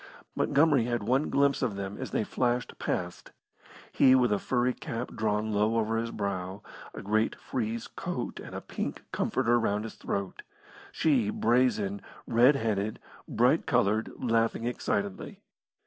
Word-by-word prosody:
Montgomery 145 Hz, -5 st, +3 dB
had 120 Hz, -2 st, -1 dB
one 130 Hz, +7 st, +1 dB
glimpse 140 Hz, 0 st, +2 dB
of 120 Hz, -6 st, 0 dB
them 100 Hz, 0 st, -5 dB
as -, -, -4 dB
they -, -, 0 dB
flashed 120 Hz, +2 st, -1 dB
past; -, -, -3 dB, 0.6 s
he 130 Hz, 0 st, +6 dB
with 125 Hz, -3 st, +3 dB
a 100 Hz, -, +1 dB
furry 125 Hz, 0 st, +1 dB
cap 125 Hz, -4 st, -5 dB
drawn 110 Hz, 0 st, 0 dB
low 105 Hz, +2 st, +2 dB
over 115 Hz, 0 st, 0 dB
his 115 Hz, +1 st, -1 dB
brow, 100 Hz, -2 st, -4 dB, 0.3 s
a -, -, -7 dB
great 110 Hz, +2 st, +1 dB
frieze 115 Hz, -2 st, -3 dB
coat -, -, -5 dB
and -, -, -9 dB
a -, -, -4 dB
pink -, -, -5 dB
comforter 120 Hz, -2 st, +1 dB
round 105 Hz, -2 st, 0 dB
his 110 Hz, -, -6 dB
throat; 100 Hz, -1 st, -4 dB, 0.5 s
she 130 Hz, -10 st, +2 dB
brazen, 115 Hz, -4 st, +1 dB, 0.2 s
red 125 Hz, +5 st, +5 dB
headed, 110 Hz, -4 st, -1 dB, 0.3 s
bright -, -, +2 dB
coloured, 110 Hz, +3 st, +2 dB
laughing 115 Hz, -2 st, +1 dB
excitedly. 100 Hz, -5 st, -3 dB
115 Hz, 145 wpm, -29 LUFS, 105-125 Hz, 0.6 s, he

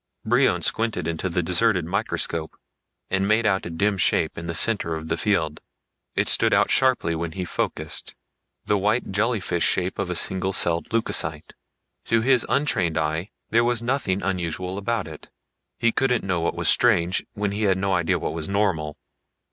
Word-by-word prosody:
Brion -, -, +2 dB
squinted 110 Hz, -7 st, 0 dB
into 85 Hz, +3 st, -2 dB
the 90 Hz, 0 st, -1 dB
deserted 90 Hz, +1 st, +2 dB
microscope 85 Hz, -4 st, -2 dB, 0.5 s
and 95 Hz, 0 st, +1 dB
made 110 Hz, +2 st, +2 dB
out 95 Hz, -3 st, +1 dB
a -, -, -6 dB
dim 100 Hz, +4 st, 0 dB
shape 80 Hz, -1 st, +2 dB
in 85 Hz, -, -7 dB
the 85 Hz, -, -3 dB
center 85 Hz, -2 st, +1 dB
of 80 Hz, 0 st, -7 dB
the 80 Hz, -, +1 dB
field. 85 Hz, -5 st, -1 dB, 0.5 s
It -, -, +1 dB
stood -, -, +3 dB
out -, -, +2 dB
sharply 130 Hz, -10 st, +3 dB
when 80 Hz, 0 st, -4 dB
he 95 Hz, 0 st, -4 dB
focused 75 Hz, -2 st, -4 dB, 0.5 s
the 105 Hz, -, +1 dB
white, 105 Hz, +3 st, 0 dB
jellyfish 100 Hz, -4 st, 0 dB
shape 95 Hz, +1 st, +1 dB
of 100 Hz, -2 st, -2 dB
a 90 Hz, -, -2 dB
single 95 Hz, +2 st, +2 dB
celled 85 Hz, -2 st, +2 dB
leucocyte. 115 Hz, 0 st, 0 dB, 0.5 s
To 115 Hz, -1 st, +2 dB
his 130 Hz, 0 st, +2 dB
untrained 110 Hz, -, +1 dB
eye 80 Hz, +5 st, -2 dB, 0.2 s
there 115 Hz, +2 st, +4 dB
was 120 Hz, -1 st, 0 dB
nothing 115 Hz, -7 st, -1 dB
unusual 90 Hz, 0 st, -3 dB
about 110 Hz, +1 st, -2 dB
it. 80 Hz, -1 st, -11 dB, 0.5 s
He 115 Hz, -, +2 dB
couldn't 125 Hz, -1 st, 0 dB
know 90 Hz, -3 st, -1 dB
what 85 Hz, -, -1 dB
was -, -, -1 dB
strange, 90 Hz, -7 st, +3 dB
when 105 Hz, -1 st, -2 dB
he 105 Hz, +2 st, -4 dB
had 95 Hz, -2 st, +2 dB
no 95 Hz, 0 st, -1 dB
idea 85 Hz, -2 st, +1 dB
of -, -, -4 dB
what -, -, -2 dB
was 80 Hz, 0 st, -3 dB
normal. 90 Hz, -7 st, -1 dB
95 Hz, 180 wpm, -23 LUFS, 85-110 Hz, 0.5 s, there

